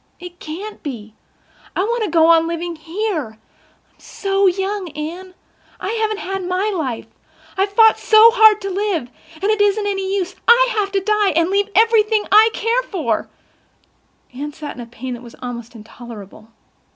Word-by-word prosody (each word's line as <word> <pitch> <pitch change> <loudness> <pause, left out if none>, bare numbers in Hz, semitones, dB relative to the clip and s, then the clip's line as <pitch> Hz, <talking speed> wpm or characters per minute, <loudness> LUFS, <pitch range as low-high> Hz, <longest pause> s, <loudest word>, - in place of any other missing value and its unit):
It 355 0 -11
can't 385 +7 -8
be. 220 -7 -7 0.6
I 370 - +1
want 470 +2 -1
to 415 - -2
go 320 0 +4
on 330 0 +4
living 335 0 -4
here. 320 - -4 0.6
I'm - - -37
so 390 0 0
young, 385 0 -2
Anne. 350 +5 -7 0.4
I - - -4
haven't 440 -2 -1
had 385 -1 -4
my 370 +4 -1
life. 260 -9 -3 0.5
I've 390 +1 0
fought 445 +1 +5
so 440 +1 +6
hard 435 -3 +6
to 395 -1 -4
live—and 365 -5 -4
it 425 +1 +1
isn't 410 +1 +2
any 390 -1 -2
use—I 470 +6 +2
have 400 -1 -1
to 390 - +1
die—and 385 -5 +1
leave 400 +1 +1
everything 440 -1 +3
I 430 +2 +7
care 460 +3 0
for." 315 - -3 1.0
Anne 290 +3 -6
sat 300 -1 -7
in 245 - -9
a 235 - -9
pain 245 +2 -7
that 240 - -8
was 235 -2 -13
almost 240 -2 -7
intolerable. 220 -2 -12
380 Hz, 165 wpm, -19 LUFS, 305-420 Hz, 1.0 s, I